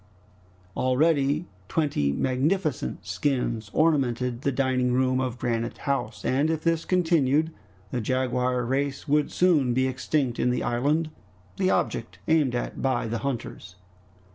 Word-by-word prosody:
Already 145 +3 +2 0.2
twenty 140 - 0
magnificent 140 - -1
skins 110 +2 -1
ornamented 125 -6 +1
the 140 - +1
dining 130 -1 +1
room 130 0 +2
of 125 -2 -2
Granite 115 -1 -2
House, 135 -6 -3
and 140 +4 +2
if 160 -1 -1
this 165 -1 +1
continued, 160 -4 +2 0.4
the 125 - -1
jaguar 125 0 0
race 140 +3 -2
would 150 0 +2
soon 150 -9 +3
be 130 0 +2
extinct 130 -1 -1
in - - +2
the 125 - 0
island, 150 +7 0 0.5
the 185 -1 +2
object - - -1
aimed 150 -6 +3
at 120 - -3
by 130 -3 0
the 115 +1 -2
hunters. 120 -9 -5
130 Hz, 135 wpm, -26 LUFS, 125-150 Hz, 0.5 s, soon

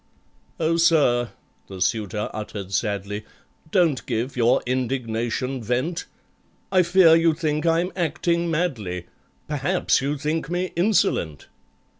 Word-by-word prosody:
"Oh, 165 0 +1
sir," 145 -8 +3 0.4
the 95 -1 -9
suitor 105 +3 -1
uttered 105 -2 -6
sadly, 105 0 -2 0.5
"Don't 165 -7 +2
give 120 +4 -2
your 120 -1 +3
indignation 125 0 -2
vent; 125 +10 -2 0.7
I 185 -1 +5
fear 170 -1 +6
you 165 -1 +3
think 155 0 -1
I'm 170 +3 +2
acting 170 0 0
madly, 115 - -2 0.4
Perhaps 150 +4 +1
you 145 +2 -1
think 155 +3 -2
me 180 +1 -2
insolent?" 170 - +1
140 Hz, 115 wpm, -23 LUFS, 115-170 Hz, 0.7 s, fear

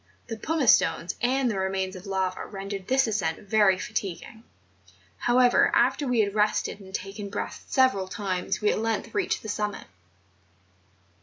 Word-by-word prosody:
The 225 - -4
pumice 295 +1 +3
stones 165 +1 -2
and 255 +2 +2
the 195 - -2
remains 190 0 -2
of 185 +2 -10
lava 190 -1 -2
rendered 195 -1 -6
this 265 +1 +3
ascent 200 -8 -1
very 205 -2 +4
fatiguing; 200 +3 -5 0.8
however, 245 0 +4
after 290 - +2
we 245 -3 +3
had 200 -1 -1
rested 210 -1 0
and 190 -1 -13
taken 200 +1 -5
breath 200 - -5
several 255 -8 +2
times 190 -1 -3
we 210 - +3
at - - -1
length 225 -1 -2
reached 390 -4 -1
the - - -7
summit. 210 -1 -3
205 Hz, 155 wpm, -26 LUFS, 190-225 Hz, 0.8 s, very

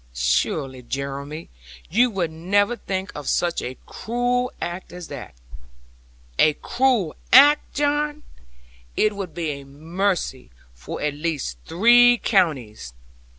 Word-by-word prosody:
Surely, 95 - 0
Jeremy, 140 +4 -5 0.4
you 240 +7 +3
would 180 -7 -2
never 200 +8 +1
think 190 -3 -4
of 145 -2 -5
such 175 -1 0
a 130 +1 -6
cruel 245 +2 -1
act 175 +2 -5
as 180 -1 -9
that!' - - -8 1.0
'A 155 -1 +5
cruel 245 -10 0 0.2
act, 290 +4 +6
John! 295 +1 0 0.7
It 215 -1 +2
would 185 -6 -6
be 165 -3 -2
a 140 -1 -7
mercy 160 - -3 0.2
for - - -8
at 150 -1 0
least 145 - -3
three 240 +7 +6
counties. 130 - 0
175 Hz, 120 wpm, -23 LUFS, 140-235 Hz, 1.0 s, act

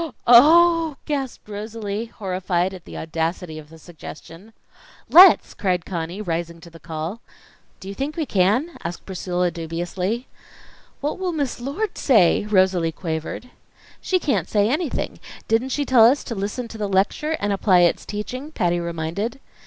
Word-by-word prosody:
"Oh!" 325 +5 +6
gasped 275 -7 -4
Rosalie, 210 0 -5
horrified 185 -3 -2
at 185 -2 -11
the - - -9
audacity 160 0 -3
of 150 -1 -14
the 165 - -14
suggestion. 165 +4 -12 0.6
"Let's!" 365 0 +8
cried 180 -3 -1
Conny, 175 +3 -4
rising 170 -2 -3
to 170 - -13
the 165 - -14
call. 160 +7 -6 0.6
"Do 190 - -11
you 195 - -5
think 280 +9 -4
we 320 - -1
can?" 220 - +1
asked 170 +1 -6
Priscilla, 180 -2 -2
dubiously. 175 +7 -4 0.7
"What 295 +5 -2
will 370 -2 -2
Miss 285 -6 -2
Lord 295 - -3
say?" 210 - +4
Rosalie 185 -5 +2
quavered. 160 +9 -5 0.5
"She 375 - +1
can't 215 - -1
say 205 0 +2
anything. 305 0 -2 0.3
Didn't 230 +4 +1
she 285 +2 -1
tell 250 -4 +6
us 265 +5 +4
to - - -5
listen 210 +4 -4
to 220 - -9
the 205 -1 -2
lecture 220 +12 0
and 205 0 0
apply 190 -2 +3
its 175 - +2
teaching?" 255 +8 -6
Patty 175 - 0
reminded. 170 +8 -4
200 Hz, 155 wpm, -22 LUFS, 175-255 Hz, 0.7 s, Let's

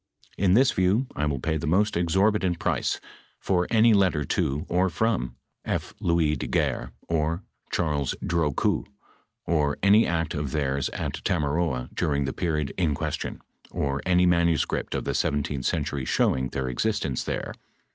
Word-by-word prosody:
In 95 0 +3
this 130 +3 +5
view, 95 +8 +2
I 75 - 0
will 70 -2 -1
pay 80 +5 -1
the 80 +1 -4
most 100 +6 +2
exorbitant 95 +1 +2
price - - -1 0.4
for 90 -2 0
any 115 0 +5
let 95 -4 +4
ter 75 -2 -1
to 70 +3 -1
or 90 +2 +2
from 85 - -1 0.3
F. - - -3
Louis 85 -3 +2
de 65 - -4
Guerre, - - -1 0.2
or 80 +2 0 0.3
Charles 75 -5 0
Drocoux, 80 -5 +1 0.6
or 75 -3 +1
any 105 +3 +6
act 85 -2 -1
of 75 -2 -3
theirs 70 -3 0
at - - -4
Tamaroa 75 -5 0
during 70 -2 0
the 65 - -3
period 75 -5 -1
in 80 -5 +2
question, - - -4 0.3
or 70 0 -2
any 90 0 +3
manuscript 85 -3 +1
of - - -2
the - - -1
I7th 70 -2 -1
century 75 -3 -1
showing 65 0 +1
their 65 0 -3
existence 70 - -1
there. - - -3
80 Hz, 155 wpm, -26 LUFS, 70-90 Hz, 0.6 s, any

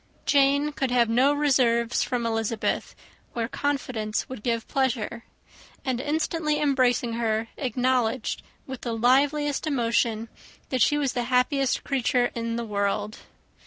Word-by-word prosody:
Jane 280 +1 +3
could 270 -3 -2
have 240 -2 +3
no 255 +5 +4
reserves 250 -5 +2
from 245 -2 -1
Elizabeth, 225 -1 -1 0.4
where 230 -1 -2
confidence 245 -6 -2
would 260 -4 -8
give 230 0 -1
pleasure; 240 -3 -1 0.6
and, 255 -2 -1
instantly 305 +1 -1
embracing 255 -5 +2
her, 225 -1 -1
acknowledged, 255 -2 0 0.2
with 265 -2 -7
the 235 - -3
liveliest 285 +5 +2
emotion, 230 -4 0 0.4
that 255 -2 -1
she 295 - +4
was 280 -3 0
the 245 -1 -1
happiest 255 +2 +1
creature 250 -2 +1
in 230 0 -3
the 235 0 -3
world. 205 0 -2
250 Hz, 130 wpm, -25 LUFS, 230-275 Hz, 0.6 s, no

